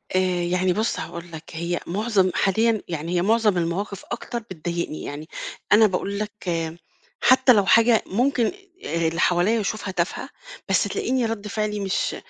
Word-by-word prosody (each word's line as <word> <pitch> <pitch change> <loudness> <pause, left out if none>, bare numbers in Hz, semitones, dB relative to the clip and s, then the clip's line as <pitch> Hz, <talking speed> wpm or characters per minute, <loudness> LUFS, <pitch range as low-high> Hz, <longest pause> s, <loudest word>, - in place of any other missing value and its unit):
آآ - - +5 0.2
يعني 180 +1 +1
بُص 220 +4 -1
هاقول 170 0 -7
لك 160 -1 -8
هي 170 +2 -2
مُعظم 195 0 +1
حاليًا 220 +2 +2
يعني 165 +1 -3
هي - - +2
مُعظم 215 0 +3
المواقِف 180 +4 -2
أكتر 240 0 -4
بتضايقني، 170 -6 -5
يعني 150 +2 -6 0.4
أنا 215 +1 +7
باقول 200 +2 -2
لك 210 0 -3 0.9
حتّى 255 0 +6
لو 200 -3 +3
حاجة 230 +1 +5
ممكن 245 +3 +1 0.4
آآ 165 0 0
اللي 165 +1 -2
حواليّا 180 +6 +3
يشوفها 210 -1 -3
تافهة 175 -1 -2 0.4
بس - - +3
تلاقيني 255 -2 0
رَد 220 -2 -3
فعلي 210 0 -2
مش 195 -1 -1
200 Hz, 155 wpm, -23 LUFS, 175-225 Hz, 0.9 s, أنا